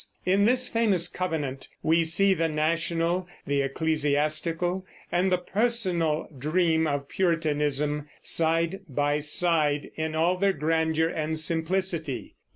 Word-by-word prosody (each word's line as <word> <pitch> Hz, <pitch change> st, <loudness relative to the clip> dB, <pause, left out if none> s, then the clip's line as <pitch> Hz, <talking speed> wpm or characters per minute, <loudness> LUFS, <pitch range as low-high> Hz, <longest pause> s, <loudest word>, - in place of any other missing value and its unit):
In 195 Hz, +2 st, +3 dB
this 250 Hz, +2 st, +3 dB
famous 205 Hz, -7 st, +2 dB
Covenant 155 Hz, -8 st, -4 dB, 0.2 s
we 165 Hz, +1 st, +3 dB
see 190 Hz, +5 st, +4 dB
the 165 Hz, -3 st, 0 dB
national, 165 Hz, +3 st, -1 dB, 0.2 s
the 140 Hz, 0 st, 0 dB
ecclesiastical, 155 Hz, +5 st, 0 dB, 0.3 s
and 180 Hz, +2 st, +1 dB
the 180 Hz, -, +3 dB
personal 180 Hz, -6 st, 0 dB
dream 160 Hz, +3 st, +1 dB
of 140 Hz, -1 st, -2 dB
Puritanism, 150 Hz, -4 st, 0 dB
side 165 Hz, +3 st, +1 dB
by 145 Hz, +2 st, 0 dB
side, 150 Hz, -1 st, +2 dB
in 160 Hz, 0 st, -4 dB
all 170 Hz, +3 st, +1 dB
their 195 Hz, +1 st, +2 dB
grandeur 160 Hz, +1 st, 0 dB
and 160 Hz, -1 st, -3 dB
simplicity. 165 Hz, -2 st, -1 dB
160 Hz, 120 wpm, -26 LUFS, 150-180 Hz, 0.3 s, see